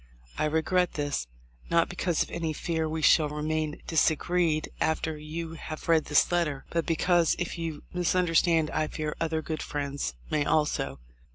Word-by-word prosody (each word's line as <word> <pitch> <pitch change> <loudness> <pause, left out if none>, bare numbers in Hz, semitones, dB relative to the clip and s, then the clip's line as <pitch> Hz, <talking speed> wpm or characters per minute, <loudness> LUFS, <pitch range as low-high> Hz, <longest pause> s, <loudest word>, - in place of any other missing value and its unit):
I - - 0
re 160 +1 +1
gret 180 0 +1
this, 145 - -2 0.4
not 170 0 +3
because 175 -2 0
of - - -12
any 165 -2 -2
fear 160 0 -2
we 160 0 -3
shall 155 -3 +5
remain 155 0 -2
disagreed 160 0 +1
after 160 0 0
you 160 +2 -6
have 155 -1 -7
read 165 -2 +4
this 150 +3 +3
letter, 155 -6 0
but 165 -1 -1
because 170 0 +3
if 175 - -3
you 160 -3 -4
misunderstand 170 -2 +2
I 155 0 0
fear 155 -1 -4
other 160 -1 0
good 155 0 -3
friends 140 - -3 0.2
may 150 - +2
also." 150 - 0
160 Hz, 165 wpm, -28 LUFS, 150-170 Hz, 0.4 s, shall